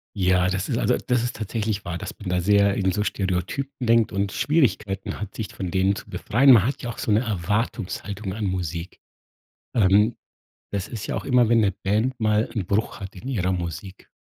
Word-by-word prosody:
Ja, 90 -2 +3
das 95 +1 -2
ist - - -1
also, - - +2
das 125 -1 0
ist 120 - -3
tatsächlich 110 -1 -2
wahr, 85 0 -3
dass - - -6
man 100 - -7
da 90 0 +1
sehr 100 +2 +4
in 95 -2 +1
so 105 - -1
Stereotypen 100 +9 -2
denkt 115 -1 +4
und 100 -1 -1
Schwierigkeiten 110 - 0
hat, 105 -1 -6
sich 110 - -3
von 90 -2 -4
denen 95 +2 +2
zu - - -9
befreien. 135 +5 +4
Man 110 -5 +7
hat 135 - -2
ja 120 - -3
auch 120 - -6
so - - -2
'ne 105 - +4
Erwartungshaltung 105 -1 -2
an 105 +1 -3
Musik. 90 -2 -3 0.8
Ähm, 105 +1 +4 0.6
das 100 -1 -2
ist 110 -3 -6
ja - - -2
auch - - -4
immer, 125 -4 +4
wenn 115 -1 +5
'ne 100 -2 +3
Band 110 +7 0
mal 110 0 +2
'n 105 -5 -2
Bruch 105 +3 -1
hat 95 0 -8
in 100 +7 -9
ihrer 95 -9 0
Musik. 90 +2 -5
100 Hz, 205 wpm, -24 LUFS, 95-115 Hz, 0.8 s, Man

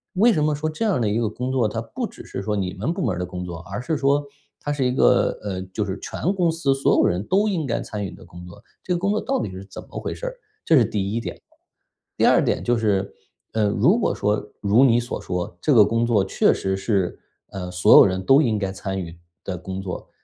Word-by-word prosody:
为 225 +5 +5
什 150 -5 +1
么 150 - +2
说 155 +2 -2
这 155 +8 -4
样 205 - +1
的 115 - +1
一 105 +2 0
个 115 -3 0
工 125 +4 -4
作， 125 -5 +1
它 115 +1 -3
不 240 - -5
只 - - -13
是 - - -5
说 105 +1 -2
你 95 -2 -2
们 115 - -2
部 190 - -4
门 - - 0
儿 - - -5
的 90 - -2
工 90 0 -6
作， 85 -2 -6
而 100 +6 -6
是 160 +6 -2
说 140 +1 +2 0.3
它 145 - -3
是 140 - -1
一 125 - +2
个， - - +3
呃， 95 -3 -3
就 95 +3 -4
是 95 -1 -4
全 185 - -2
公 180 -4 +2
司 160 -4 +1
所 135 - +2
有 - - +4
人 90 +3 0
都 200 +3 +2
应 170 -9 -1
该 115 - -1
参 105 -2 -5
与 - - -4
的 - - -13
工 90 +1 -12
作， 90 +5 -14 0.2
这 180 - -2
个 - - +1
工 200 +2 0
作 215 - 0
到 270 0 -1
底 - - -4
是 95 +1 -8
怎 95 - -10
么 - - -7
回 - - -4
事 - - -7
儿？ - - -3 0.3
这 160 - +4
是 130 - +6
第 100 -2 -2
一 115 - 0
点。 - - -6 0.8
第 - - +3
二 - - +5
点 - - 0
就 120 - +2
是， 100 -3 0 0.4
呃， 110 -2 +2
如 140 - +3
果 - - 0
说 105 0 -1
如 105 +6 +4
你 120 -1 +4
所 120 - -5
说， 90 -1 -4
这 - - +1
个 105 -4 +7
工 115 +2 0
作 105 -5 +2
确 95 - +3
实 95 0 -2
是， 95 -3 -1 0.3
呃， 90 -2 -5
所 90 0 +6
有 - - +9
人 95 -1 -1
都 135 +7 +6
应 115 -6 +1
该 95 -2 -2
参 95 0 -4
与 85 -1 -8 0.3
的 95 - -4
工 95 +2 -6
作， 95 -2 -6
110 Hz, 290 characters per minute, -23 LUFS, 95-145 Hz, 0.8 s, 有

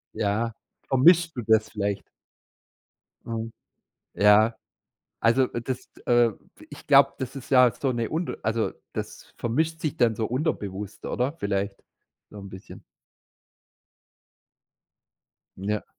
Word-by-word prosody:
Ja, 110 +3 0 0.3
vermischst 165 +5 +5
du 125 - -3
das 110 0 +3
vielleicht? 100 -2 -3 1.2
Mhm. 115 0 -4 0.6
Ja. 105 +2 +5 0.7
Also, 125 +3 +4
dass 125 +2 -5
t - - -18
äh, 120 -1 +4 0.4
ich - - -12
glaube, - - +6
das 130 0 -5
ist 130 - -10
ja 125 -3 +7
so 135 +3 -1
'ne 115 -1 -2
unter 165 +2 -3
also, 110 +1 0 0.2
das - - -7
vermischt 160 +8 -1
sich 155 - -2
dann 115 -3 +3
so 110 - -1
unterbewusst, 105 - -3
oder? 125 +4 -1
Vielleicht, 100 -3 -2 0.5
so 105 - -12
'n 100 -1 -9
bisschen. 95 0 -11 2.8
Ja. 105 +2 -2
115 Hz, 120 wpm, -26 LUFS, 105-130 Hz, 2.8 s, ja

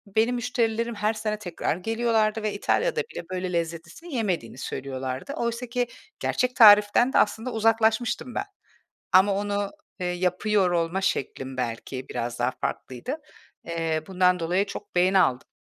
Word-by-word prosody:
benim 230 +3 +3
müşterilerim 235 -1 -1
her 210 +1 0
sene 215 -1 -3
tekrar 175 -6 -2
geliyorlardı 225 +1 +1
ve 215 -1 -1
İtalya'da 470 - +1
bile 460 0 -7
böyle 185 0 -3
lezzetlisini 170 - -4
yemediğini 180 - -2
söylüyorlardı. 130 - -5
Oysa 235 -3 -2
ki 245 +1 -1 0.3
gerçek 250 0 0
tariften 210 +3 +7
de - - +3
aslında 225 +4 +1
uzaklaşmıştım 225 +2 +1
ben. 395 - -1 0.7
Ama 190 +2 +6
onu, 205 0 -1 0.3
ııı, 180 - 0
yapıyor 185 +2 +1
olma 170 +2 0
şeklim 135 -7 -2
belki 125 +2 -4
biraz 120 0 -4
daha 120 +1 +1
farklıydı. 130 - -4 0.5
Iıı, 165 -2 -1
bundan 180 -1 +3
dolayı 180 +4 +1
çok 200 - -9
beğeni 185 +2 +4
aldım. 125 -7 +2
205 Hz, 140 wpm, -26 LUFS, 170-225 Hz, 0.7 s, tariften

